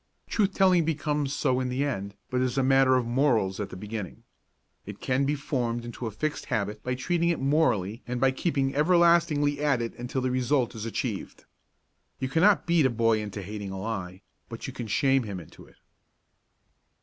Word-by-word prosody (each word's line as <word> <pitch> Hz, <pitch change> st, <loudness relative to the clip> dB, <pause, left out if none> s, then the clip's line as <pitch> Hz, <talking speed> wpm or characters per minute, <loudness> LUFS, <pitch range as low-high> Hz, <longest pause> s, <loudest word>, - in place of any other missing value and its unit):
Truth 200 Hz, -3 st, 0 dB
telling 185 Hz, -3 st, +4 dB
becomes 150 Hz, -2 st, -1 dB
so 130 Hz, -3 st, +1 dB
in 130 Hz, -1 st, -1 dB
the 130 Hz, +3 st, -1 dB
end 100 Hz, -8 st, -3 dB, 0.2 s
but 125 Hz, 0 st, +1 dB
is 130 Hz, 0 st, -1 dB
a 135 Hz, -, +3 dB
matter 135 Hz, 0 st, +4 dB
of 125 Hz, -2 st, +1 dB
morals 120 Hz, -6 st, +1 dB
at 105 Hz, -, -3 dB
the -, -, -9 dB
beginning. 105 Hz, -1 st, -6 dB, 0.6 s
It 105 Hz, 0 st, -9 dB
can 130 Hz, +1 st, 0 dB
be 145 Hz, +2 st, +1 dB
formed 120 Hz, -4 st, -2 dB
into 120 Hz, 0 st, -5 dB
a -, -, -4 dB
fixed 155 Hz, +8 st, -3 dB
habit 105 Hz, 0 st, -2 dB
by 125 Hz, +2 st, -2 dB
treating 170 Hz, +6 st, 0 dB
it 170 Hz, -, 0 dB
morally 135 Hz, -, +1 dB
and 125 Hz, 0 st, -2 dB
by 135 Hz, +1 st, +4 dB
keeping 135 Hz, -1 st, -1 dB
everlastingly 165 Hz, -2 st, +3 dB
at 140 Hz, -5 st, +2 dB
it 115 Hz, -1 st, -3 dB
until 125 Hz, +2 st, -3 dB
the 130 Hz, 0 st, 0 dB
result 125 Hz, 0 st, +1 dB
is 110 Hz, -1 st, -6 dB
achieved. 115 Hz, -2 st, -4 dB, 0.7 s
You 130 Hz, -1 st, -2 dB
cannot 185 Hz, +8 st, +4 dB
beat 170 Hz, -5 st, +4 dB
a -, -, -1 dB
boy 115 Hz, -2 st, +2 dB
into 105 Hz, -1 st, -6 dB
hating 100 Hz, +1 st, -6 dB
a 95 Hz, 0 st, -5 dB
lie, 95 Hz, -3 st, -5 dB, 0.3 s
but -, -, -7 dB
you -, -, -6 dB
can 120 Hz, -, -6 dB
shame 135 Hz, +5 st, +2 dB
him 100 Hz, -5 st, -5 dB
into 80 Hz, -, -14 dB
it. -, -, -21 dB
130 Hz, 195 wpm, -27 LUFS, 110-145 Hz, 0.7 s, telling